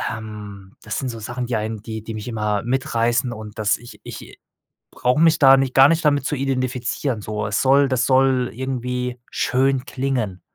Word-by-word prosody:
Ähm, 105 -3 -9
das 110 -2 -3
sind 130 - -3
so 115 - -6
Sachen, 120 +3 -4
die 120 - -1
einen 110 0 -4
die 110 -1 -6
die 115 - -6
mich 105 +1 -7
immer 105 -3 -1
mitreißen 120 0 0
und 110 -1 -10
das 105 0 +2
ich 120 - -13
ich - - -10 0.5
brauche 125 +3 +1
mich 165 -1 +5
da 135 -2 +8
nicht 135 -1 0
gar 135 +1 +8
nicht 165 0 +1
damit 145 -2 +2
zu 150 - -1
identifizieren, 130 -2 -2
so. 105 +1 -4
Es 105 0 0
soll 135 +1 +4
das 130 -2 +1
soll 130 -1 +3
irgendwie 125 0 -3
schön 130 +1 +1
klingen. 125 -9 -2
125 Hz, 190 wpm, -21 LUFS, 110-135 Hz, 0.5 s, da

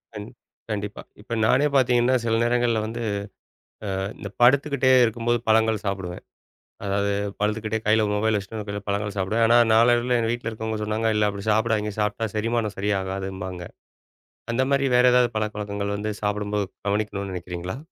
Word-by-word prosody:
கண் 105 +1 -6 0.4
கண்டிப்பா. 105 -1 -4 0.2
இப்ப 115 - -7
நானே 140 +6 +4
பாத்தீங்கன்னா 125 -1 +3
சில 115 -1 +1
நேரங்கள்ல 120 -1 +2
வந்து, 115 +2 -5 1.0
ஆ, - - -2 0.2
இந்தப் 100 0 -9
படுத்துக்கிட்டே 135 +1 +4
இருக்கும்போது 120 +1 0
பழங்கள் 110 -1 +3
சாப்டுவேன். 95 -2 -4 0.6
அதாவது 100 0 0 0.3
படுத்துக்கிட்டே 110 +1 -1
கையில 110 0 +4
மொபைல 110 +1 +1
வச்சுட்டு 100 +3 -8
ஒரு 105 - -5
கையில - - -3
கொஞ்சம் 100 - -25
பழங்கள் 100 0 -2
சாப்பிடுவேன். 105 +5 +1
ஆனா 120 - +6
நாளடைவில 120 +2 +4
என் 115 - 0
வீட்ல 120 -1 -3
இருக்கவங்க 110 0 -4
சொன்னாங்க, 110 +1 0
இல்ல 105 0 +3
அப்படி 100 0 -7
சாப்டாதீங்க. 110 -1 +1
சாப்ட்டா 105 +2 -1
செரிமானம் 110 -1 -1
சரியாகாதும்பாங்க. 95 -2 -3 0.9
அந்த 130 +3 +2
மாரி 140 0 +2
வேற 125 - +5
ஏதாவது 125 -1 +4
பழக்கவழக்கங்கள் 100 -1 -3
வந்து 105 +1 -3
சாப்பிடும்போது 105 0 -1 0.2
கவனிக்கணும்னு 100 -1 -2
நினைக்கிறீங்களா? 90 +3 -5
110 Hz, 150 wpm, -24 LUFS, 100-115 Hz, 1.0 s, ஆனா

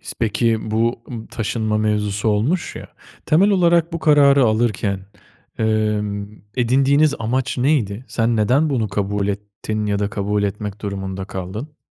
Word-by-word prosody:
İs - - -7
peki, 110 0 0
bu, 115 +2 0
ımm, 115 -3 -7
taşınma 110 -1 -2
mevzusu 105 0 0
olmuş 125 - 0
ya, - - -9 0.4
temel 190 +7 +4
olarak 170 -3 +3
bu 165 - -2
kararı 140 -3 +5
alırken, 110 -4 0 0.6
emm, 105 -2 0 0.3
edindiğiniz 140 +4 +3
amaç 125 +4 -1
neydi? 125 -5 +1
Sen 115 0 0
neden 130 +9 +2
bunu 115 -6 0
kabul 100 0 -1
ettin 105 +1 -4
ya 100 -1 0
da 100 0 -1
kabul 105 +1 -1
etmek 100 0 -4
durumunda 95 -2 -4
kaldın? 105 - -7
110 Hz, 140 wpm, -20 LUFS, 105-130 Hz, 0.6 s, kararı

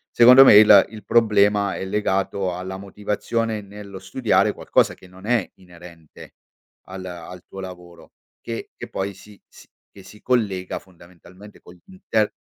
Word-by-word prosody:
Secondo 125 +3 +8
me 105 - +8
il 105 -2 +8
il 110 -1 -12
problema 105 -3 +2
è - - -5
legato 95 -2 -2
alla 95 +1 -7
motivazione 105 +3 -3
nello 100 -1 -11
studiare 105 +5 0
qualcosa - - +1
che - - -17
non 95 +2 -15
è 115 -4 0
inerente 85 -3 -16 0.5
al 95 0 -9
al 90 0 -10
tuo 95 - -11
lavoro 90 -2 -11 0.3
che 115 -1 -7
che - - -8
poi 95 +1 -4
si 100 +2 -17
si - - -19 0.2
che 100 - -15
si 105 - -16
collega 100 -7 -1
fondamentalmente 90 +2 -18
con 90 - -16
m 90 - -22
l'intern 145 - -1
100 Hz, 155 wpm, -21 LUFS, 90-105 Hz, 0.5 s, Secondo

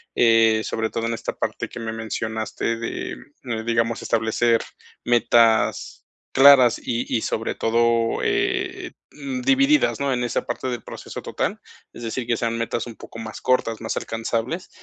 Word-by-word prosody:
Eh, 115 -2 +5
sobre 110 0 -2
todo 115 +1 -3
en 115 - -1
esta 115 - -4
parte - - -3
que - - -8
me 110 0 -4
mencionaste 110 0 -3
de, 115 - -4 0.5
digamos, 115 0 0
establecer 115 +1 +1 0.4
metas 115 -1 +2 0.3
claras 135 -3 +7
y 120 0 -2
y 110 - +1
sobre 110 - -2
todo, 115 0 +1
eh, 380 -3 -1 0.2
mm, 265 -2 -5
divididas, 275 - +3
¿no? 140 -1 0
En 125 -1 -1
esa 120 - -1
parte 120 +2 -4
del 120 -2 -4
proceso - - -8
total. - - -3 0.3
Es 120 - -10
decir, 120 +2 -3
que 115 -1 0
sean 115 -1 -1
metas 115 +1 -2
un 115 - -9
poco 115 - -11
más 110 -1 -7
cortas, 115 -3 +1
más 110 - -3
alcanzables. 115 +9 -3
115 Hz, 160 wpm, -23 LUFS, 115-130 Hz, 0.5 s, claras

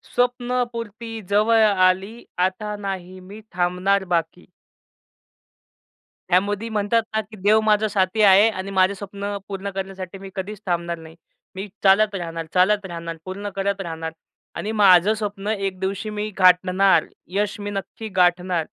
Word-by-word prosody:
स्वप्नपूर्ती 240 -3 -2
जवळ 220 +2 +4
आली, 195 +3 +2 0.2
आता 210 +3 -3
नाही 185 -2 -6
मी 200 +4 -11
थांबणार 180 +2 +1
बाकी. 165 +2 -3 1.9
ह्यामध्ये 205 +4 +1
म्हणतात 220 +2 +1
ना 220 - +1
की 215 +1 -14
देव 215 +2 +5
माझा 215 0 +3
साथी 200 +1 0
आहे 200 +3 +7
आणि 195 -1 -5
माझं 190 +1 +3
स्वप्न 200 +1 -5
पूर्ण 200 0 -5
करण्यासाठी 190 -1 -6
मी 195 0 -10
कधीच 195 +2 -5
थांबणार 170 -2 -1
नाही. 160 0 -13 0.4
मी 195 +2 -5 0.2
चालत 205 +2 +4
राहणार, 165 -3 -4
चालत 195 +2 +3
राहणार, 170 -2 -6
पूर्ण 200 +2 -5
करत 195 0 -1
राहणार 160 -2 -5 0.4
आणि 215 - -3
माझं 200 -1 +5
स्वप्न 205 -2 -5
एक 195 -3 -2
दिवशी 200 +3 -3
मी 210 0 -3
गाठणार. 185 +1 +4 0.3
यश 205 0 -1
मी 205 0 -4
नक्की 205 +3 -6
गाठणार. 180 -2 +2
195 Hz, 140 wpm, -22 LUFS, 185-210 Hz, 1.9 s, आहे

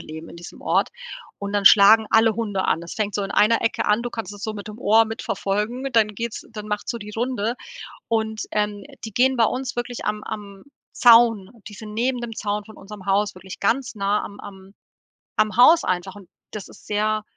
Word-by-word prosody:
leben 160 +1 -9
in - - -12
diesem 170 0 -11
Ort - - +1 0.5
und 200 0 -5
dann 205 -1 0
schlagen 215 +2 +8
alle 225 0 +4
Hunde 205 -5 -2
an. 160 - +1
Das 170 - -8
fängt 210 -3 -2
so 205 - -1
in 195 - -5
einer 225 +3 +3
Ecke 230 - 0
an- 210 +2 +2
du 240 - -4
kannst 220 -5 -6
das 205 - -12
so 220 - -3
mit 210 0 -8
dem 215 +2 -9
Ohr 225 0 +4
mitverfolgen- 225 +3 -3
dann 225 -2 +4
geht's 230 +2 -5
dann 210 -2 -8
macht's 210 0 -3
so 235 - -4
die 210 -1 -9
Runde 235 -1 -1 0.5
und, 220 -1 -1
ähm, 210 -1 -1 0.2
die 220 - -7
gehen 260 +4 +3
bei 235 - +3
uns 255 +3 -3
wirklich 240 0 -4
am 210 0 -2
am 200 -3 -8 0.3
Zaun 230 -5 +5 0.2
die 210 - -11
sind 210 +1 -9
neben 245 +2 0
dem 235 -1 -5
Zaun 210 -1 -3
von 220 - -14
unserem 200 -1 -11
Haus 200 +1 +1
wirklich 185 +1 -10
ganz 250 +2 0
nah 200 +1 0
am 205 - -9
am 190 0 -12 0.6
am 215 0 +1
Haus 320 +7 +7
einfach 185 +1 -2
und 195 -4 -14 0.2
das 215 - -8
ist - - -17
sehr 215 +1 0
210 Hz, 215 wpm, -22 LUFS, 200-230 Hz, 0.6 s, schlagen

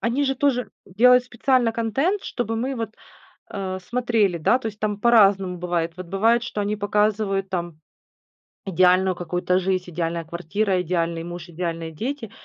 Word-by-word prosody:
Они 250 +5 0
же 270 - 0
тоже 260 -2 0
делают 250 +6 +5
специально 245 -1 +1
контент, 270 - 0
чтобы 225 -2 -3
мы 260 +4 -2
вот, 225 -3 -5 0.6
э, 190 -1 -3
смотрели. 215 -3 0
Да, 240 +10 +3
то 240 - -6
есть, 210 -1 -6
там 210 -1 -2
по-разному 195 -6 +4
бывает. 170 -1 -1
Вот 185 -1 -7
бывает, 225 +6 +2
что 240 -4 -4
они 205 +1 -1
показывают 205 -1 0
там 175 -3 -4 0.9
идеальную 185 0 +3
какую-то 180 +1 0
жизнь: 185 -1 -2
идеальная 165 0 -2
квартира, 180 +4 -1
идеальный 170 -1 -1
муж, 175 0 -8
идеальные 165 -1 -4
дети, 230 - -5
195 Hz, 155 wpm, -23 LUFS, 180-230 Hz, 0.9 s, делают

